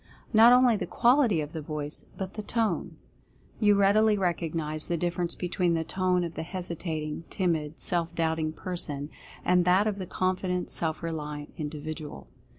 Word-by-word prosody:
Not 225 +2 +8
only 250 -2 +6
the - - -3
qual 250 +4 +4
ity 205 - +2
of 150 0 -6
the 160 - -4
voice, 150 0 -5
but 190 -1 -5
the 215 - -4
Tone. 225 +1 -1 0.6
You 205 -2 +5
readily 210 +2 +4
recognize 165 -4 -1
the 170 - 0
difference 175 0 -1
between 180 -1 0
the 165 - 0
tone 180 +1 +1
of 170 -1 -4
the - - -4
hesitating, 165 -3 -4
timid, 160 -5 -1
self 170 -1 0
doubting 160 -1 0
person, 155 -4 -4 0.3
and 180 0 +4
that 185 +3 +4
of 210 -2 -1
the 185 - -5
confident, 185 0 -1
self 160 0 -1
reliant 150 -3 -4
individual. 150 0 -6
175 Hz, 160 wpm, -28 LUFS, 155-190 Hz, 0.6 s, Not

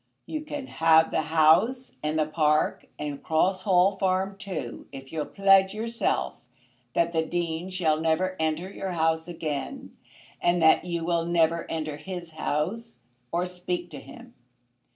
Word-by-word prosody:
"You 310 - -4
can 295 -2 -6
have 160 -6 +4
the - - +1
house 160 - +3
and 150 +1 -1
the 155 - +2
park, 155 0 +1
and 145 -2 -5
Cross 185 +4 +1
Hall 190 0 +3
Farm, 190 +1 0
too, 185 -12 -6
if 135 0 -10
you'll 155 -2 -2
pledge 195 0 +4
yourself 230 +2 -1 0.6
that 170 0 +2
the 160 -1 +2
Dean 170 +1 -3
shall 160 -4 0
never 170 +4 +1
enter 160 +3 -1
your 190 -2 -4
house 160 0 +1
again, 165 - -5 0.5
and 175 0 +2
that 160 +1 +5
you 170 -2 -3
will 170 -1 +1
never 170 -1 +1
enter 155 -2 -3
his 175 0 -7
house 155 - -3 0.3
or 175 +1 0
speak 180 -1 -4
to 145 - -7
him. 135 0 -13
170 Hz, 155 wpm, -26 LUFS, 160-185 Hz, 0.6 s, that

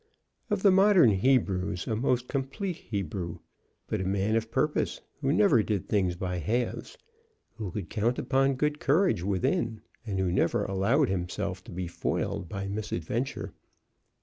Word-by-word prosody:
Of 205 -2 -1
the 200 - +7
modern 190 - +6
Hebrews 95 -5 +1
a 110 - -1
most 125 +1 0
complete 140 +7 -3
Hebrew; 95 -4 -4 0.5
but - - -2
a - - -1
man 100 +3 +1
of 115 0 0
purpose, 150 +6 0 0.2
who 135 -1 +1
never 155 - +5
did 105 -3 -2
things 95 -4 +1
by 90 0 -3
halves, 120 +9 -2 0.6
who 105 -4 -4
could 95 -1 -5
count 115 +3 +1
upon 135 0 +2
good 150 +2 0
courage 160 - +2
within, 105 +4 0 0.2
and 105 -4 -3
who 95 -2 +1
never 90 - +1
allowed 110 +9 +2
himself 95 +1 -3
to - - -10
be 90 +1 -3
foiled 85 0 -2
by 100 -1 -4
misadventure. 105 - -3
110 Hz, 150 wpm, -28 LUFS, 95-135 Hz, 0.6 s, the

